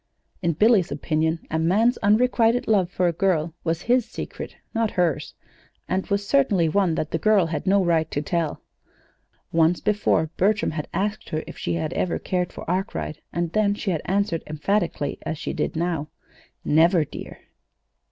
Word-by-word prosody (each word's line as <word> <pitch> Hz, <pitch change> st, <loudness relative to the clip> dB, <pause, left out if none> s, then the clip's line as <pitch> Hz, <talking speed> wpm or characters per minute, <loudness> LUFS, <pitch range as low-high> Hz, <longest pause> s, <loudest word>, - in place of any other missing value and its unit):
In 170 Hz, -3 st, +1 dB
Billy's 210 Hz, -, +3 dB
opinion, 160 Hz, +2 st, 0 dB
a 160 Hz, -, 0 dB
man's 215 Hz, +9 st, +2 dB
unrequited 230 Hz, +2 st, +3 dB
love 195 Hz, -5 st, +3 dB
for 180 Hz, -1 st, +1 dB
a 170 Hz, -, +1 dB
girl 170 Hz, -3 st, +1 dB
was 165 Hz, +1 st, -1 dB
his 245 Hz, +1 st, +3 dB
secret, -, -, -7 dB, 0.2 s
not 225 Hz, -2 st, +1 dB
hers, 170 Hz, -6 st, 0 dB, 0.5 s
and 185 Hz, +1 st, -1 dB
was 200 Hz, 0 st, -1 dB
certainly 210 Hz, -12 st, +3 dB
one 180 Hz, 0 st, +2 dB
that 155 Hz, -, -3 dB
the 165 Hz, -, -1 dB
girl 210 Hz, -1 st, +4 dB
had 165 Hz, +3 st, -4 dB
no 195 Hz, 0 st, +4 dB
right 160 Hz, -2 st, +2 dB
to -, -, -2 dB
tell. 160 Hz, +1 st, -2 dB, 0.9 s
Once 165 Hz, +1 st, +3 dB
before 200 Hz, -7 st, +1 dB
Bertram 210 Hz, +3 st, +2 dB
had 155 Hz, -1 st, -4 dB
asked 205 Hz, +2 st, -2 dB
her 155 Hz, 0 st, -2 dB
if -, -, -9 dB
she -, -, -2 dB
had 160 Hz, -2 st, -2 dB
ever 180 Hz, -, 0 dB
cared 180 Hz, -1 st, -2 dB
for -, -, -9 dB
Arkwright, 180 Hz, -4 st, -3 dB
and 170 Hz, -1 st, -2 dB
then 205 Hz, +1 st, +2 dB
she 205 Hz, -1 st, -2 dB
had 160 Hz, -, -1 dB
answered 195 Hz, -3 st, 0 dB
emphatically, 155 Hz, -1 st, -1 dB
as 160 Hz, -, -4 dB
she -, -, -4 dB
did -, -, -2 dB
now: 165 Hz, -3 st, -1 dB, 0.6 s
"Never, 165 Hz, +1 st, +4 dB
dear." -, -, -9 dB
175 Hz, 170 wpm, -24 LUFS, 160-205 Hz, 0.9 s, girl